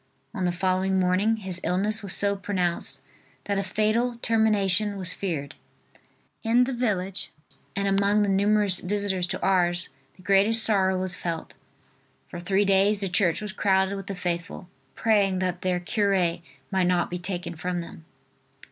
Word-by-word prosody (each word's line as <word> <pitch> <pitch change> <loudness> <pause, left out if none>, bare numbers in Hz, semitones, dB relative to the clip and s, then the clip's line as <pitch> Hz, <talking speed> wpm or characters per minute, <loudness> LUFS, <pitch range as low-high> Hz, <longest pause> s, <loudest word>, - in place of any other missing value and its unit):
On 190 -5 -2
the 175 - +1
following 185 +1 0
morning 185 +5 +2
his 190 -3 -5
illness 205 +5 +1
was 200 -4 -1
so 200 0 +1
pronounced 185 -3 -1 0.4
that 200 -1 -1
a - - -1
fatal 225 +4 0
termination 210 -2 +2
was 185 -2 -4
feared. 160 -8 -4 0.9
In 235 +2 +3
the 265 +1 -2
village 195 -6 -2 0.4
and 200 0 0
among 200 +2 +2
the - - 0
numerous 200 -1 +3
visitors 190 -1 -1
to - - -4
Ars 175 -2 +2 0.3
the 185 - -18
greatest 200 +4 +4
sorrow 190 -3 +2
was 185 0 -1
felt. 170 -2 -5 0.8
For 175 - -7
three 195 +3 +1
days 200 +1 +3
the 195 - 0
church 180 -2 +1
was 210 -2 -5
crowded 190 -1 +1
with 195 -1 -7
the 195 - -4
faithful, 175 0 -4 0.3
praying 205 -4 +2
that 180 -1 -2
their 180 -1 0
cure 190 -3 0 0.3
might 190 -2 +2
not 180 -1 +1
be 180 - -3
taken 175 -1 -4
from 175 +2 -3
them. 165 -1 -11
190 Hz, 160 wpm, -25 LUFS, 180-205 Hz, 0.9 s, greatest